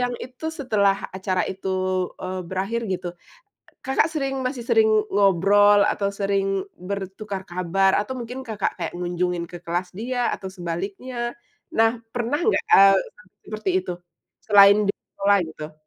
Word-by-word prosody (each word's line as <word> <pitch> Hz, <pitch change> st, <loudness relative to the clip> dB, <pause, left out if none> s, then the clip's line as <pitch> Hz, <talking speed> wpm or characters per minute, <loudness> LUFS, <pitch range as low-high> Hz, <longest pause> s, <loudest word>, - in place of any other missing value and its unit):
yang 245 Hz, 0 st, 0 dB
itu, 260 Hz, +5 st, -6 dB
setelah 200 Hz, -6 st, +2 dB, 0.2 s
acara 185 Hz, -1 st, -1 dB
itu, 190 Hz, 0 st, -7 dB, 0.5 s
eee, 185 Hz, 0 st, -4 dB
berakhir 195 Hz, +5 st, -2 dB
gitu, 180 Hz, -1 st, -3 dB, 0.8 s
Kakak 270 Hz, +4 st, +2 dB
sering 270 Hz, -3 st, -2 dB
masih 255 Hz, -2 st, -3 dB
sering 440 Hz, -1 st, +5 dB, 0.2 s
ngobrol, 205 Hz, +1 st, +5 dB
atau 200 Hz, -1 st, 0 dB
sering 195 Hz, -1 st, -1 dB
bertukar 195 Hz, +1 st, -5 dB
kabar, 185 Hz, +2 st, +2 dB
atau 210 Hz, +5 st, -5 dB
mungkin 250 Hz, +2 st, -6 dB
Kakak 215 Hz, -3 st, -2 dB
kayak 170 Hz, -2 st, -4 dB
ngunjungin 175 Hz, -1 st, -2 dB
ke 175 Hz, -, -7 dB
kelas 175 Hz, +1 st, -3 dB
dia, 245 Hz, +4 st, -1 dB
atau 190 Hz, -, -6 dB
sebaliknya? 200 Hz, +8 st, -5 dB, 0.4 s
Nah, 225 Hz, +1 st, +3 dB
pernah 245 Hz, +4 st, -1 dB
nggak, 435 Hz, -, +2 dB
eee, 195 Hz, 0 st, +8 dB, 0.2 s
sampai 210 Hz, -3 st, -22 dB
seperti 215 Hz, -2 st, -4 dB
itu 180 Hz, -1 st, -5 dB, 0.5 s
selain 205 Hz, -1 st, +7 dB
di 200 Hz, -, +1 dB
sekolah, 200 Hz, 0 st, 0 dB
gitu? 155 Hz, -1 st, -7 dB
200 Hz, 145 wpm, -23 LUFS, 185-235 Hz, 0.8 s, eee